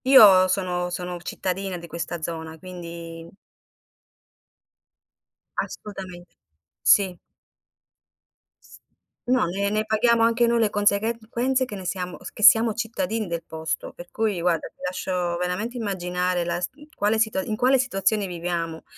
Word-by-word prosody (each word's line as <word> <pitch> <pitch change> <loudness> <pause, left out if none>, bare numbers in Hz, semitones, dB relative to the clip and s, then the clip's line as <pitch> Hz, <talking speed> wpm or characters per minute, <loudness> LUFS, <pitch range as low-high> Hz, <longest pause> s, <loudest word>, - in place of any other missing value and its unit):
Io 205 -8 +8
sono 180 -2 -1
sono 180 0 -4
cittadina 185 +1 -3
di 170 - -9
questa 170 0 -5
zona, 160 -1 -5
quindi 170 -1 -9 2.3
Assolutamente. 185 -4 -6 0.5
Sì. 190 -3 +4 1.5
S - - -16 0.5
no, 255 +1 +3
ne 195 +4 -1
ne 215 +1 0
paghiamo 225 +2 +3
anche 230 +1 +4
noi 235 0 +2
le 220 -2 +3
conseghe 205 +2 +2
conseguenze 250 +4 0
che 215 - -7
ne 190 -2 -8
siamo 180 -1 -3
s - - -7
che 215 - -7
siamo 225 0 +7
cittadini 225 -1 -2
del 170 -1 -3
posto. 160 0 -4
Per 175 0 -11
cui, 215 -5 0
guarda, 170 -2 +1
ti - - -22
lascio 180 -1 -2
veramente 180 +8 -2
immaginare 180 -4 -1
la 170 0 -1
s 180 - -1 0.3
quale 210 +2 +1
situa 220 -4 +1
in 215 - -3
quale 255 +4 +4
situazione 210 -4 +1
viviamo. 170 -2 -3
190 Hz, 140 wpm, -24 LUFS, 175-220 Hz, 2.3 s, Io